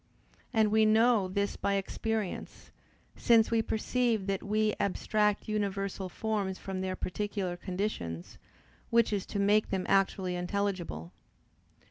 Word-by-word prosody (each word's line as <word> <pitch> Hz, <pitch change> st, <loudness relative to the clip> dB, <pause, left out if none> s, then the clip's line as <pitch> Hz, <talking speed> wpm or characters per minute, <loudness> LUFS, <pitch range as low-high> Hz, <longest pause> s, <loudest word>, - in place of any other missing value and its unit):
And 220 Hz, -3 st, +3 dB
we 220 Hz, 0 st, +5 dB
know 220 Hz, -1 st, +4 dB
this 200 Hz, +2 st, -1 dB
by 200 Hz, -, 0 dB
experience, 210 Hz, +1 st, -3 dB, 0.4 s
since 230 Hz, -2 st, +4 dB
we 230 Hz, -1 st, +3 dB
perceive 225 Hz, -1 st, 0 dB
that 195 Hz, -1 st, -1 dB
we 215 Hz, +1 st, +1 dB
abstract 210 Hz, +1 st, +1 dB
universal 195 Hz, -2 st, -2 dB
forms 205 Hz, -2 st, -2 dB
from 190 Hz, -1 st, -5 dB
their 185 Hz, 0 st, -2 dB
particular 195 Hz, -1 st, -3 dB
conditions, 175 Hz, -, -4 dB, 0.5 s
which 230 Hz, -2 st, +3 dB
is 200 Hz, -2 st, -2 dB
to -, -, -4 dB
make 205 Hz, +2 st, +3 dB
them 190 Hz, -2 st, -1 dB
actually 190 Hz, -2 st, +2 dB
intelligible. 180 Hz, -, -2 dB
200 Hz, 125 wpm, -30 LUFS, 190-215 Hz, 0.5 s, we